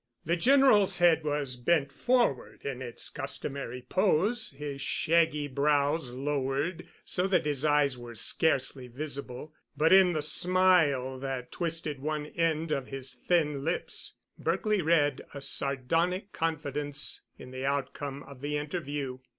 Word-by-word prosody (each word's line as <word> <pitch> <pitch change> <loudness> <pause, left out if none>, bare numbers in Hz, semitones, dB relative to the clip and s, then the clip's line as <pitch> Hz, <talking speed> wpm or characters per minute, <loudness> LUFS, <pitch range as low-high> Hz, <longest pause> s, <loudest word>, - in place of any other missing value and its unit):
The 170 +2 +2
General's 250 -1 +5
head 170 -3 +4
was 145 -3 -1
bent 140 +3 +1
forward 240 - 0
in 135 -2 -4
its 120 -2 -5
customary 125 -2 -5
pose, 205 +5 +2
his 140 0 -6
shaggy 160 -1 +2
brows 145 +1 +1
lowered 140 +5 -2 0.2
so 180 +1 0
that 190 -4 +2
his 145 -2 -1
eyes 145 -4 +3
were 120 -1 -9
scarcely 135 +2 0
visible, 140 +2 -6 0.2
but 160 +4 +4
in 190 -2 +7
the 155 -2 -1
smile 155 -6 +3
that 130 -2 -4
twisted 165 -4 -3
one 150 +1 -2
end 165 0 -1
of 135 -3 -1
his 135 -1 -6
thin 150 +1 0
lips 165 +4 -2 0.2
Berkely 215 -3 +1
read 150 -4 +2
a - - -4
sardonic 165 +9 -1
confidence 150 -2 -2 0.2
in 125 - -11
the 130 +1 -3
outcome 140 0 -3
of 135 -2 -13
the 150 +1 -1
interview. 145 -4 -4
145 Hz, 135 wpm, -29 LUFS, 135-165 Hz, 0.2 s, in